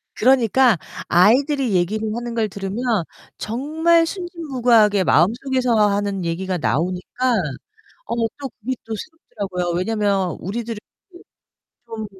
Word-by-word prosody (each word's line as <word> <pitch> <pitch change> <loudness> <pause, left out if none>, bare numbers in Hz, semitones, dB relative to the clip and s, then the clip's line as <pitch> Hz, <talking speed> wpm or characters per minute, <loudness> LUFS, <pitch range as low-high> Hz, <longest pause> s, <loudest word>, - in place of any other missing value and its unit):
그러니까 250 -2 +4 0.3
아이들이 255 - +3
얘기를 210 +5 0
하는 240 0 -5
걸 225 -2 +1
들으면 195 +4 -5 0.5
정말 320 +8 +1
순진무구하게 255 - +1
마음속에서 245 - +2
하는 200 -2 -1
얘기가 180 +2 -2
나오니까 180 - -1 0.7
어 - - -2 0.2
또 275 -2 -5
그게 260 +4 -2
또 225 - -5
새롭더라고요. 195 - -5
왜냐면 200 -3 0
우리들은 225 +4 -4 0.3
그 350 - -15 0.7
좀 220 -1 -6
225 Hz, 290 characters per minute, -21 LUFS, 195-260 Hz, 0.7 s, 그러니까